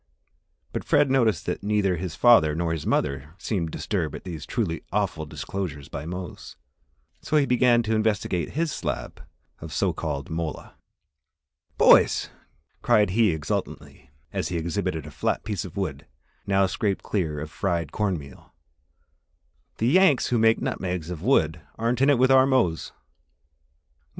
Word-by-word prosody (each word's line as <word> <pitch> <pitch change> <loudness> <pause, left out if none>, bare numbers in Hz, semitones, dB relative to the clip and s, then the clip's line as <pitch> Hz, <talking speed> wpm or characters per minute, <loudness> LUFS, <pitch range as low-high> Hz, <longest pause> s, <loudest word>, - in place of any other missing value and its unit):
But - - -3
Fred 145 -2 +3
noticed 120 -6 +2
that - - -3
neither 100 -2 +1
his 85 -1 -5
father 80 -11 +5
or 80 -1 0
mother 70 +4 -1
seemed 95 -6 -2
disturbed - - -3
at - - -9
these 80 -6 -7
truly 95 -10 -2
awful 80 -1 -1
disclosures 75 -4 -5
by 70 +3 -6
Mose, 90 +1 -7 0.7
so 155 - 0
he 145 - +4
began 125 -2 +3
to 110 0 -1
investigate 105 -6 0
his 160 +1 0
slab - - -4 0.4
of - - -9
so - - 0
called 70 +1 -4
mola. 80 -1 -4 1.0
"Boys," - - +5 0.5
cried 105 -3 +3
he 110 +2 +3
exultantly, 75 -3 -4 0.2
as 95 -2 -1
he 90 - -2
exhibited 85 -1 -2
a 75 - -9
flat - - -1
piece 105 -3 -3
of 95 +1 -10
wood, 75 -8 -4 0.4
now 100 0 +3
scraped 100 +1 -1
clear 80 -7 -2
of 75 +1 -6
fried 85 -6 -2
cornmeal, 90 -10 -4 1.2
"the 110 - -1
Yanks 165 -1 +4
who 120 - +2
make 115 0 +4
nutmegs 90 -2 -3
of 85 -3 -6
wood 80 - +2 0.2
aren't 115 +2 0
in 135 - +5
it 140 - +5
with 130 +2 +4
our 130 0 +6
Mose!" 120 -12 +1
"Well! - - -36
95 Hz, 150 wpm, -25 LUFS, 80-115 Hz, 1.2 s, our